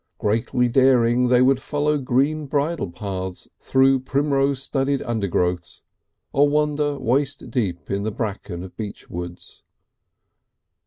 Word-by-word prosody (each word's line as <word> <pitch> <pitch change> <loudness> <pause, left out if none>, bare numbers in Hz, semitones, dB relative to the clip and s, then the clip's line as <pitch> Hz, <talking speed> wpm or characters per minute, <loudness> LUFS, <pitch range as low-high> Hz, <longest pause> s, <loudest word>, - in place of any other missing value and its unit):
Greatly 115 +3 +1
daring, 125 -1 +4
they 125 0 +5
would 130 0 +3
follow 150 0 0
green 140 +4 0
bridle 145 - -1
paths 95 0 -5
through 135 0 +3
primrose 140 0 0
studded 135 0 0
undergrowths, 90 -6 -2 0.5
or 145 +1 +4
wander 150 -1 +1
waist 135 +1 -1
deep 95 -8 -2
in 100 0 0
the 105 - -1
bracken 100 -5 -5
of 95 - -11
beech 105 -2 -7
woods. 90 0 -8
125 Hz, 120 wpm, -22 LUFS, 100-140 Hz, 0.5 s, they